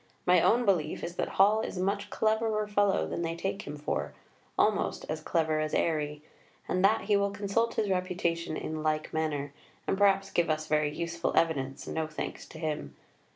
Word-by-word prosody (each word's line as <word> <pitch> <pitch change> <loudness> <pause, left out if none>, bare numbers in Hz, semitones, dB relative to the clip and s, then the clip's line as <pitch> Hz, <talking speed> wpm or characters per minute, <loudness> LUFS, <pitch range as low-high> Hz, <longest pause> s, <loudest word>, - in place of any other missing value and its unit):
My 180 0 +5
own 240 +1 +4
belief 170 -7 +1
is 170 - -4
that - - 0
Hall 210 +3 +5
is - - -4
a 180 - 0
much 200 +1 -1
cleverer 220 -1 +1
fellow 205 -1 +2
than - - -3
they 165 0 -2
take 195 +3 -3
him 150 +1 -5
for, 145 - -3 0.4
almost - - +1
as 155 0 -3
clever 155 -1 +1
as 155 0 -1
Airey, 150 -2 0 0.4
and 185 +1 0
that 210 +3 +4
he 210 - +2
will 200 0 +2
consult 205 +3 0
his 215 - +1
reputation 175 -3 -1
in 155 0 -4
like 155 0 -1
manner, 145 -3 -1 0.3
and - - +1
perhaps 195 -1 +3
give 170 -1 +1
us 155 0 0
very 150 -1 +1
useful 170 +1 -2
evidence, 135 -5 +1
no 160 -1 -2
thanks 155 - -6
to - - -11
him.... 155 -2 -3
170 Hz, 190 wpm, -30 LUFS, 155-200 Hz, 0.4 s, My